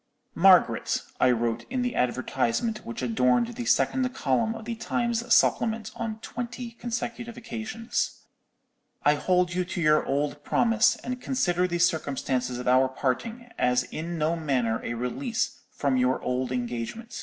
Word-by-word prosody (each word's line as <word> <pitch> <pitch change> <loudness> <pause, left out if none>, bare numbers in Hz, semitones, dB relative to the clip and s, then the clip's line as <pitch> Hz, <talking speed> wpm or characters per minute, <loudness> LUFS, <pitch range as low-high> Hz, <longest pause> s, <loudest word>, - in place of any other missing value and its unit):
"'Margaret,' - - +4 0.2
I 130 - +5
wrote 120 -1 0
in 255 -1 -1
the 245 - -1
advertisement 130 - 0
which 115 +2 -5
adorned 125 - +2
the 240 0 -5
second 255 +1 +2
column 225 -3 +1
of 225 - -8
the 235 - -3
Times 235 +1 -2
Supplement 225 -1 +3
on 225 -2 -4
twenty 245 0 -5
consecutive 235 0 -5
occasions, 225 -1 -3 0.8
'_I 145 +1 +5
hold 180 +2 +1
you 180 +1 0
to 180 - -5
your 155 -2 +4
old 145 +1 -2
promise, 230 0 +3
and 250 0 -4
consider 180 -9 +1
the 175 -1 -1
circumstances 135 -7 0
of 125 - -5
our 130 +1 +5
parting 225 - -3
as 125 0 +3
in 165 +6 -5
no 160 +2 +1
manner 130 -8 0
a 120 - -3
release 220 - -2
from 140 -3 0
your 125 +1 +2
old 125 0 -1
engagement. 125 - -4
175 Hz, 150 wpm, -27 LUFS, -, 0.8 s, I